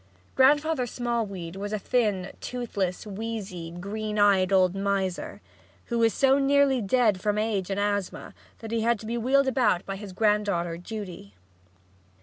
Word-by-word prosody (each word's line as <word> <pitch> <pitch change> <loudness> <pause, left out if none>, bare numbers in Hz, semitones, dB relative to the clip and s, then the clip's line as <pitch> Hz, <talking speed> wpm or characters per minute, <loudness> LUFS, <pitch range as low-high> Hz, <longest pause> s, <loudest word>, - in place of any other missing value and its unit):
Grandfather 290 0 +3
Smallweed 215 -8 -3
was 205 +1 -5
a 215 - 0
thin, 205 -4 0
toothless, 205 -8 -3
wheezy, 200 -5 -5
green 210 +5 -5
eyed 200 -2 +4
old 185 -2 +4
miser, 195 -2 -2 0.4
who 235 -1 -2
was 225 -1 +4
so 270 +2 +3
nearly 275 -2 +3
dead 215 -2 +2
from 210 +1 0
age 210 -4 -1
and 195 0 -1
asthma 205 -2 -2 0.3
that 225 -1 -7
he 230 -1 0
had 230 -1 +1
to - - -9
be 230 +2 -3
wheeled 270 +4 +3
about 235 -9 +2
by 195 - -4
his 205 -1 -8
granddaughter 200 -4 +1
Judy. 180 - -8
210 Hz, 150 wpm, -26 LUFS, 190-235 Hz, 0.4 s, eyed